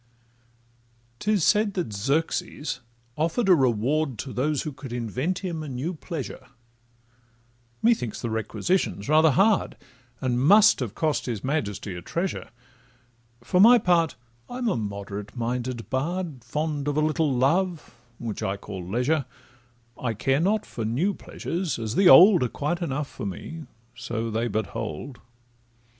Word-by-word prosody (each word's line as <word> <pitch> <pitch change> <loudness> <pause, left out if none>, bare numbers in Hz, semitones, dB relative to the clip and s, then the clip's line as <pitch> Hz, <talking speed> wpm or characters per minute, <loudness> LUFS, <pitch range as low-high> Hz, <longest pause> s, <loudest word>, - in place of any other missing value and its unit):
'Tis 210 -4 +1
said 210 +1 +3
that 175 - -2
Xerxes 140 +5 -1 0.4
offer'd 165 - 0
a 190 - +7
reward 135 0 +1
To 130 +4 -6
those 145 +2 0
who 155 - -4
could 135 -2 -10
invent 130 - -2
him 170 -3 -3
a 155 - -6
new 135 +8 -3
pleasure: 150 - -7 1.4
Methinks 220 - +2
the 115 - -3
requisition 110 - -1
's - - -9
rather 155 +1 +6
hard, 195 - +2 0.4
And 125 -2 0
must 205 +9 +6
have 120 -5 -4
cost 155 -4 0
his 115 -5 -3
majesty 105 - -2
a 90 - -7
treasure: 175 - -3 0.9
For 180 +9 +2
my 240 +4 +9
part, 175 -6 +2 0.3
I'm 245 0 -3
a 210 - +1
moderate 100 0 -5
minded 120 0 -3
bard, 150 -1 -2
Fond 150 +3 -2
of 145 0 0
a - - +3
little 155 -1 +1
love 160 +7 +1 0.2
(which 115 -2 -5
I 100 -2 -1
call 95 -2 -7
leisure); 125 - 0 0.8
I 115 -3 -1
care 135 +6 +1
not 205 +5 +1
for 115 - -6
new 135 - 0
pleasures, 175 -1 -4
as 110 -2 -3
the 190 +4 +5
old 180 0 +9
Are 125 - +1
quite 155 +8 -2
enough 145 -3 -2
for 115 -7 -6
me, 155 - -7 0.3
so 115 -2 -4
they 115 +2 0
but 110 0 -1
hold. 115 +3 -6
140 Hz, 150 wpm, -25 LUFS, 115-170 Hz, 1.4 s, my